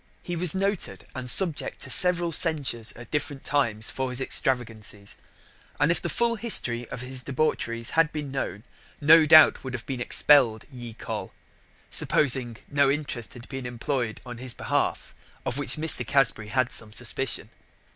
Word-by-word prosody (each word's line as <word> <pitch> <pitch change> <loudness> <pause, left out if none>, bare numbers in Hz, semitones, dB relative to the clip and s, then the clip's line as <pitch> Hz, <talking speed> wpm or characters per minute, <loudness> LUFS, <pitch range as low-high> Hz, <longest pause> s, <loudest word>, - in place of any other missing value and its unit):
He 175 - -5
was 175 +1 +4
noted, 195 0 -3
and 130 -1 -5
subject 170 +1 +4
to 130 - -3
severall 175 0 +3
censures 145 -9 +2
at 120 - -14
different 145 -2 -4
times 115 -7 +1
for 130 -1 -4
his 125 0 0
extravagancies: 110 -6 -2 0.6
and 145 +3 +3
if 170 - -1
the 170 - -3
full 235 +7 -1
history 120 - +1
of 125 - -7
his 130 0 -4
debaucheries 125 -5 -1
had 165 -1 +2
bin 150 -3 -6
known, 105 -7 -5 0.4
no 155 +1 +5
doubt 155 0 +6
would 130 -1 -7
have 120 - -8
been 130 -3 -5
expell'd 125 -4 +3
ye 120 -3 -9
Coll., - - -7 0.6
supposing 130 -4 +3
that - - -19
no 140 -1 +2
interest 140 -5 -3
had 120 +1 -12
been 135 -2 -7
imploy'd 120 -1 -4
on 120 -1 -9
his 130 -1 -4
behalf, - - -3 0.3
of 120 - -3
which 145 - -2
Mr. 160 +1 +2
Casbury 135 -6 0
had 130 +3 -1
some 110 -2 -4
suspicion. 105 - -2
130 Hz, 165 wpm, -25 LUFS, 120-155 Hz, 0.6 s, doubt